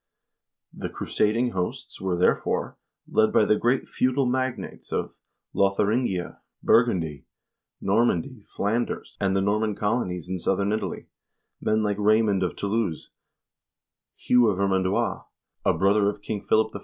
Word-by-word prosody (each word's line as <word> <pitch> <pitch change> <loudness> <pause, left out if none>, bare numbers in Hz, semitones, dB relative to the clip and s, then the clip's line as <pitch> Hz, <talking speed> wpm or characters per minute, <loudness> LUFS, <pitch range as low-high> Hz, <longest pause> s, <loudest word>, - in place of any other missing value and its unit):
The - - -5
crusading 115 +4 0
hosts 90 -2 -4
were, 95 -2 -1
therefore, 90 - +1 0.3
led 110 0 +3
by 105 - +4
the 105 - +4
great 120 +4 +1
feudal 130 +1 +1
magnates 130 0 -3
of - - -2 0.4
Lotharingia, 100 -1 0 0.2
Burgundy, 90 - +2 0.5
Normandy, 110 +2 0
Flanders, 115 +4 -2
and 95 -1 +1
the 95 - +2
Norman 105 +1 0
colonies 100 -6 -1
in 95 0 -3
southern 100 +3 0
Italy; 110 - -3 0.6
men 110 0 +1
like 105 -1 0
Raymond 105 -2 +3
of 90 - -1
Toulouse, 100 -5 -2 1.0
Hugh 125 -1 +3
of 100 -4 +1
Vermandois, 95 -1 0 0.4
a - - +2
brother 100 +1 +3
of 105 0 -7
King 105 -3 -3
Philip 110 -1 +2
I. - - -4
105 Hz, 130 wpm, -25 LUFS, 95-115 Hz, 1.0 s, by